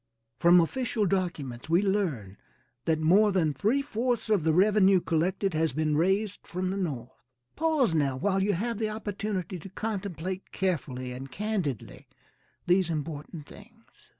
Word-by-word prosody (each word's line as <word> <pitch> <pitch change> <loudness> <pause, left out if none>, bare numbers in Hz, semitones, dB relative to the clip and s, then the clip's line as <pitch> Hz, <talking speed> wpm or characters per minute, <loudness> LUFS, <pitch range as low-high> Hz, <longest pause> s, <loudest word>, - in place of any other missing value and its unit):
From 175 +1 +7
official 225 +4 0
documents 160 -9 -2
we 170 +4 +4
learn 165 - -1 0.5
that 160 -1 +1
more 195 +7 +4
than 165 -6 +1
three 240 - +1
fourths 240 -2 -1
of 200 -7 +3
the 160 - +3
revenue 195 +2 +5
collected 180 +4 0
has 160 -1 +1
been 155 +1 0
raised 190 +5 +1
from 185 +1 -3
the 195 - -3
North. 135 -10 -3 0.4
Pause 310 - +2
now 140 -4 +1
while 195 +5 +1
you 200 +1 +2
have 225 +4 -2
the 220 -1 0
opportunity 205 -3 -4
to 195 - -10
contemplate 190 -3 -4
carefully 135 -9 -2
and 130 +1 -8
candidly 185 - -3 0.6
these 180 0 +3
important 155 0 -5
things. 225 +7 -16
185 Hz, 150 wpm, -28 LUFS, 155-205 Hz, 0.6 s, From